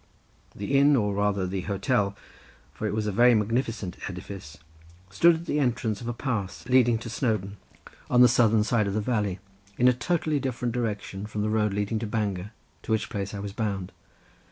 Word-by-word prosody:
The 135 +8 +1
inn, 145 +1 +5
or 105 -5 +1
rather 100 -1 0
the 95 +1 -3
hotel, 100 +1 0 0.6
for 110 - -3
it 105 - -2
was 110 -1 -1
a 105 - 0
very 120 +4 +5
magnificent 110 -3 -1
edifice, 90 -4 -8 0.5
stood 170 - +5
at 165 +1 -7
the 150 - 0
entrance 120 -5 0
of 120 - -6
a - - 0
pass 115 -7 -3
leading 125 -2 +4
to 115 - -8
Snowdon, 110 -5 -2 0.5
on 125 - +5
the 125 - +9
southern 115 -3 +4
side 110 -2 +1
of 100 - -2
the - - +1
valley 105 -4 -1 0.4
in 125 - +4
a 125 - +6
totally 155 +2 0
different 125 -3 -2
direction 105 -4 -3
from 105 -1 -3
the 105 - 0
road 105 -2 +1
leading 105 +2 -1
to 110 - -4
Bangor, 105 -3 -2 0.3
to - - -6
which 110 -1 0
place 100 -2 -4
I - - -5
was 100 -1 -6
bound. 100 -5 -3
110 Hz, 195 wpm, -26 LUFS, 100-120 Hz, 0.6 s, the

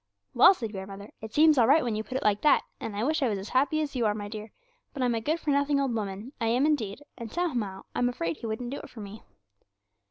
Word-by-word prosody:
"' 100 - -51
'Well,' 365 +11 +7
said 225 - -5
grandmother, 195 +1 -8
'it 220 0 -7
seems 305 +1 +5
all 230 - +5
right 300 +5 +5
when 235 -3 -1
you 215 - -2
put 255 +3 -4
it - - -4
like 210 -1 +2
that, 300 - +4 0.2
and 210 - -5
I 210 - -1
wish 310 +4 +1
I 260 - +2
was 205 - -1
as 195 +2 -7
happy 285 +4 +2
as 290 -2 -4
you 235 -3 +2
are, 210 - 0
my 205 -1 -5
dear; 215 0 -7 0.4
but 265 - -1
I'm 245 -1 +2
a 225 - -1
good 310 +8 0
for 305 - -1
nothing 285 0 +2
old 270 -3 0
woman, 210 +3 -4
I 225 - +1
am 245 +5 +3
indeed, 285 -5 -1 0.2
and 230 -2 -6
somehow 240 - -2
I'm 245 - +1
afraid 165 -9 -3
He 230 - -6
wouldn't 240 +3 -4
do 280 - -4
it - - -10
for 225 - -10
me.' 205 +1 -9
235 Hz, 280 wpm, -28 LUFS, 210-280 Hz, 0.4 s, Well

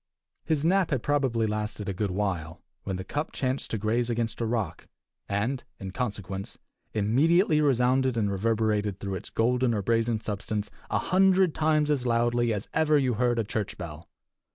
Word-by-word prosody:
His 155 -2 0
nap 185 +1 +3
had 135 -5 -1
probably 135 -6 +1
lasted 105 -1 -3
a 100 - -1
good 100 +2 -1
while, 90 -5 -2 0.3
when 95 - -2
the 95 - -4
cup 145 +11 -3
chanced 130 0 -1
to 110 - -1
graze 115 +3 0
against 115 0 -2
a 115 - 0
rock, 110 -8 -2 0.4
and, 110 +6 -1 0.2
in 95 -3 -6
consequence, 100 -4 -4 0.3
immediately 150 - +3
resounded 130 -2 +2
and 105 -3 +1
reverberated 105 -1 0
through 100 -1 -4
its 95 - -5
golden 120 +1 +1
or 100 - -1
brazen 115 +1 +1
substance 105 0 -3 0.2
a - - +1
hundred 190 -2 +3
times 155 -1 +2
as 140 -4 +1
loudly 120 0 +2
as 105 -2 -3
ever 155 -1 +3
you 130 -3 +2
heard 120 +1 +1
a 115 - +2
church 105 -1 -3
bell. 80 -2 -8
115 Hz, 175 wpm, -27 LUFS, 105-130 Hz, 0.4 s, nap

